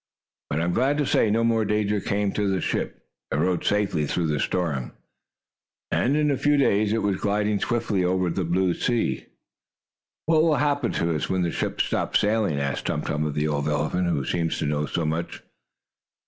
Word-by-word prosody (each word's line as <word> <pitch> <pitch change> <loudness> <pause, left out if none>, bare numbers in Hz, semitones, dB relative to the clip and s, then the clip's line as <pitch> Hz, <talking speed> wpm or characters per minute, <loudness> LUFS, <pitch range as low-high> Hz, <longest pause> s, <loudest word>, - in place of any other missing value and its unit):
But 75 - -1
I - - 0
am 85 +1 0
glad 135 +7 +2
to 145 - +1
say 110 - +2
no 115 +2 +2
more 115 -1 +2
danger 105 0 0
came 100 0 0
to 105 0 0
the 95 -1 0
ship. - - -3 0.3
It - - 0
rode 85 +4 +1
safely 100 -8 +1
through 85 +1 -1
the 75 -2 0
storm, 75 -9 -1 1.0
and 140 +4 +2
in 150 -1 +2
a 140 - 0
few 145 +2 +2
days, 105 -6 +2
it 115 - 0
was 100 -2 0
gliding 105 0 +1
swiftly 115 -6 0
over 90 -1 +1
the 95 +2 -1
blue 90 +2 +1
sea. 120 +4 -1 1.0
"What 160 0 +4
will 160 -1 +3
happen 145 0 +1
to 85 0 0
us, 75 - -2
when 95 -1 +1
the 85 - 0
ship - - -3
stops - - +1
sailing?" 105 -8 +1
asked 70 -1 -2
Tum 75 - -1
Tum 75 0 -1
of 75 - -3
the 75 +1 0
old 75 -1 -1
elephant, 75 +5 0
who 70 -5 -1
seemed 85 -2 -1
to - - -2
know 75 0 -1
so 85 - -2
much. 80 +2 -3
95 Hz, 205 wpm, -25 LUFS, 80-110 Hz, 1.0 s, What